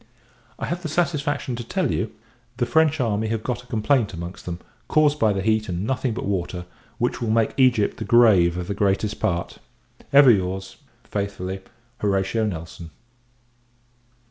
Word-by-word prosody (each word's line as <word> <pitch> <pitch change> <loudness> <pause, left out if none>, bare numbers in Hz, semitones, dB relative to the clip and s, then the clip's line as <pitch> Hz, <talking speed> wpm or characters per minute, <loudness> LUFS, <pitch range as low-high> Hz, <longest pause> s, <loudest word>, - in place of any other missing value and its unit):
I - - -4
have 175 +1 -3
the 160 - -4
satisfaction 145 -5 -1
to 120 - -5
tell - - -1
you, - - -1 0.5
the 120 - +1
French 155 +3 +3
army 110 -3 0
have 110 0 -2
got 120 -1 -2
a 125 - -20
complaint 115 -2 +1
amongst 85 +2 -8
them 85 -1 -3 0.3
caused 150 -1 +3
by 110 -2 +4
the 95 -1 -2
heat, 110 0 +1
and 90 +2 -2
nothing 130 -1 -1
but - - -4
water 90 -2 -2 0.3
which 120 +1 -1
will 115 - -1
make 110 0 +2
Egypt 125 -6 +3
the - - -4
grave 100 -8 +5
of 90 -1 -4
the 100 - -2
greatest 100 +1 0
part. 90 -5 -2 0.5
Ever 140 -2 +8
your's, 95 -1 -1 0.3
faithfully, 95 -2 -4 0.4
HORATIO 100 +2 0
NELSON. 85 -2 -7
110 Hz, 165 wpm, -23 LUFS, 95-125 Hz, 0.5 s, Ever